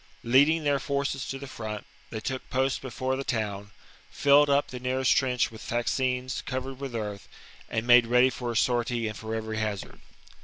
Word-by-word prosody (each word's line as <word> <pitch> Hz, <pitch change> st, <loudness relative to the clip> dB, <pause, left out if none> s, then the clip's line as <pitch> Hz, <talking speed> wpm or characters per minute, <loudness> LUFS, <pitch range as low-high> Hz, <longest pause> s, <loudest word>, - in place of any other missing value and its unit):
Leading 145 Hz, +7 st, +4 dB
their 145 Hz, -1 st, +2 dB
forces 140 Hz, 0 st, -2 dB
to 135 Hz, -, -4 dB
the 140 Hz, -, -8 dB
front, 110 Hz, -4 st, -6 dB, 0.2 s
they 110 Hz, -, -4 dB
took 130 Hz, +3 st, -4 dB
post 130 Hz, +1 st, 0 dB
before 130 Hz, 0 st, -2 dB
the 135 Hz, -, -3 dB
town, 105 Hz, -5 st, -3 dB, 0.4 s
filled 145 Hz, +1 st, +5 dB
up 140 Hz, +1 st, +2 dB
the 125 Hz, -, -6 dB
nearest 130 Hz, +1 st, +2 dB
trench 125 Hz, -3 st, +1 dB
with 110 Hz, -1 st, -11 dB
fascines 125 Hz, +2 st, -1 dB
covered 130 Hz, 0 st, -4 dB
with 135 Hz, -3 st, -5 dB
earth, 105 Hz, -3 st, -5 dB, 0.4 s
and 110 Hz, +1 st, -2 dB
made 120 Hz, -1 st, +7 dB
ready 125 Hz, +2 st, +5 dB
for 120 Hz, -2 st, -4 dB
a 115 Hz, -, -1 dB
sortie 120 Hz, -1 st, +1 dB
and 110 Hz, -, -5 dB
for 110 Hz, +1 st, -5 dB
every 110 Hz, -1 st, -3 dB
hazard. 105 Hz, -3 st, -4 dB
125 Hz, 185 wpm, -27 LUFS, 110-135 Hz, 0.4 s, made